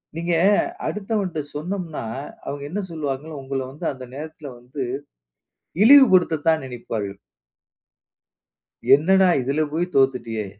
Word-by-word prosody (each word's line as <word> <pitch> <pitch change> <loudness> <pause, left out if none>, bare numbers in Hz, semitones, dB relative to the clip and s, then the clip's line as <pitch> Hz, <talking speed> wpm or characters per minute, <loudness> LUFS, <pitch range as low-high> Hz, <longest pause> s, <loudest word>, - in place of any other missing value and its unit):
நீங்க 170 +1 -1 0.5
அடுத்தவன்ட 200 -5 -2 0.2
சொன்னோம்னா, 170 -1 -4 0.4
அவங்க 140 0 -5
என்ன 205 +5 -2
சொல்வாங்க, 145 -3 -4 0.2
உங்கள 135 0 -3
வந்து 155 +5 -8
அந்த 130 -2 -9
நேரத்தில 155 +1 -8
வந்து 130 +3 -6 1.0
இழிவுபடுத்த 210 - +7
தான் 160 -3 +3
நினைப்பார்கள். 110 -5 -5 1.8
என்னடா 190 +6 +5
இதுல 140 +5 0
போய் 170 +3 0
தோத்துட்டியே. 125 -5 +1
155 Hz, 100 wpm, -22 LUFS, 135-180 Hz, 1.8 s, இழிவுபடுத்த